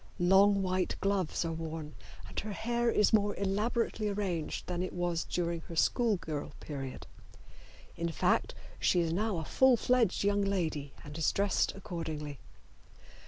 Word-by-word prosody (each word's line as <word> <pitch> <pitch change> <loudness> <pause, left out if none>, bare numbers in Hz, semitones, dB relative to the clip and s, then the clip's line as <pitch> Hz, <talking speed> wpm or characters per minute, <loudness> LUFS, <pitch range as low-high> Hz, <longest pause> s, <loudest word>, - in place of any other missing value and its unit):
Long 195 +2 +5
white 185 -1 0
gloves 195 -4 0
are 165 - -1
worn, 160 -1 -5 0.3
and - - -4
her 210 0 -5
hair 235 +2 0
is 210 -2 +3
more 205 -1 +3
elaborately 210 +2 0
arranged 190 -6 -2
than 180 -1 -3
it 185 - -3
was 175 -2 -1
during 170 -1 -1
her 170 - -7
school 225 +5 +2
girl 155 -4 -5
period. 135 -3 -6 0.9
In 170 0 -2
fact, 165 - +1 0.2
she 175 - +3
is 165 -1 0
now 210 +1 0
a 160 - -3
full 260 +5 +4
fledged 235 -6 +2
young 205 0 +2
lady 165 -8 -1
and 145 0 -9
is 160 - +3
dressed 200 -1 +1
accordingly. 155 -6 -5
185 Hz, 155 wpm, -32 LUFS, 165-205 Hz, 0.9 s, Long